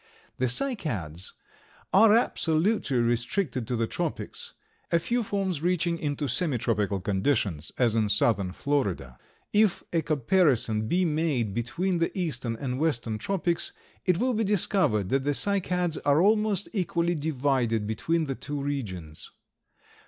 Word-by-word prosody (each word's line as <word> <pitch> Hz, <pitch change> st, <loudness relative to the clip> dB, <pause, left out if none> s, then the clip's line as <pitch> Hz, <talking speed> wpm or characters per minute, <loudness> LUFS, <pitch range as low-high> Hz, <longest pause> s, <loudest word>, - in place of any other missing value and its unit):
The 130 Hz, -, +2 dB
Cycads 120 Hz, -, -2 dB, 0.6 s
are 215 Hz, +2 st, +7 dB
absolutely 165 Hz, -, +1 dB
restricted 120 Hz, -, 0 dB
to 125 Hz, -, -1 dB
the 115 Hz, 0 st, +1 dB
tropics, -, -, -5 dB, 0.4 s
a 170 Hz, -, +5 dB
few 240 Hz, +9 st, 0 dB
forms 195 Hz, -7 st, -2 dB
reaching 170 Hz, -1 st, 0 dB
into 145 Hz, -1 st, -2 dB
semi 145 Hz, +1 st, +2 dB
tropical 105 Hz, -4 st, 0 dB
conditions, 95 Hz, -, +1 dB
as 120 Hz, -3 st, +3 dB
in 110 Hz, -2 st, +1 dB
southern 100 Hz, -2 st, +2 dB
Florida. 100 Hz, -, -2 dB, 0.3 s
If 210 Hz, -3 st, +3 dB
a 165 Hz, -, +2 dB
comparison 135 Hz, -, +2 dB
be 180 Hz, +8 st, +2 dB
made 150 Hz, -, 0 dB
between 165 Hz, -, -1 dB
the 165 Hz, -, +1 dB
eastern 130 Hz, -10 st, -2 dB
and 125 Hz, +1 st, -4 dB
western 120 Hz, -8 st, -1 dB
tropics, 175 Hz, -, -1 dB, 0.3 s
it 180 Hz, -3 st, +2 dB
will 250 Hz, +5 st, +1 dB
be 225 Hz, 0 st, 0 dB
discovered 185 Hz, -, +1 dB
that 135 Hz, 0 st, +1 dB
the 145 Hz, 0 st, 0 dB
Cycads 180 Hz, -4 st, 0 dB
are 145 Hz, +1 st, +4 dB
almost 210 Hz, +1 st, +2 dB
equally 175 Hz, -3 st, 0 dB
divided 135 Hz, -8 st, 0 dB
between 160 Hz, +10 st, 0 dB
the 135 Hz, -, -2 dB
two 145 Hz, +2 st, -5 dB
regions. 100 Hz, -, -5 dB
145 Hz, 135 wpm, -27 LUFS, 115-180 Hz, 0.6 s, are